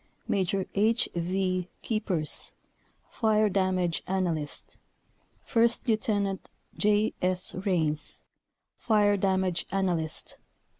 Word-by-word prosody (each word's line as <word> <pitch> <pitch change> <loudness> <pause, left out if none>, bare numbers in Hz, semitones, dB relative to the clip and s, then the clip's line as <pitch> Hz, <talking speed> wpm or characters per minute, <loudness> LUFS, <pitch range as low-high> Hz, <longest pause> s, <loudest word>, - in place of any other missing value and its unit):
Maj. 190 -1 +1 0.2
H. 220 +4 +2
V. 185 +1 -1
Keepers 195 -9 -1 0.6
Fire 215 -2 +3
damage 185 -3 +1
analyst. 170 -6 -2 0.7
1st 220 -3 +2
Lt. - - -25 0.3
J. 210 +1 +2
S. 185 0 0
Raines 165 -6 -1 0.6
Fire 205 -2 +3
damage 190 -3 0
analyst. 175 -5 -1
190 Hz, 85 wpm, -28 LUFS, 180-210 Hz, 0.7 s, Fire